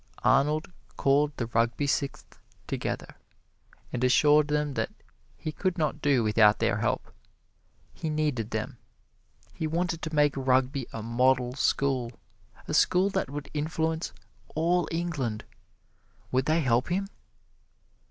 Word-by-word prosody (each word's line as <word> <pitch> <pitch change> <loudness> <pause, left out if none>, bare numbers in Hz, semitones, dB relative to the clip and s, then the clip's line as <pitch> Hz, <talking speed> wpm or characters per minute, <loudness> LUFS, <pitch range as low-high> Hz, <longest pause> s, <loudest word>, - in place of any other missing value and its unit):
Arnold 150 +6 +2 0.3
called 145 +2 +3
the 120 - -1
Rugby 115 +4 0
Sixth 140 0 -3 0.3
together - - -4 0.8
and 125 0 -2
assured 150 +4 +5
them 150 -1 0
that - - -1 0.5
he 155 - -4
could 185 +3 -2
not 155 -4 -1
do 135 -4 +3
without 105 -1 +5
their - - +1
help. - - -2 0.8
He 160 - -4
needed 150 -8 -1
them: - - -4 0.7
he 160 - -3
wanted 165 +1 -1
to 160 0 -4
make 145 -1 +4
Rugby 130 0 +1
a 115 - -6
model 125 +2 +2
school, 130 -2 0 0.5
a - - -3
school 190 +2 +3
that 190 -8 -1
would 145 0 -7
influence 160 +2 -1 0.4
all 170 +3 +2
England 155 -10 -2 0.9
would 130 +1 +1
they 160 +2 +3
help 125 -2 +2
him? 190 +3 0
145 Hz, 130 wpm, -28 LUFS, 125-160 Hz, 0.9 s, assured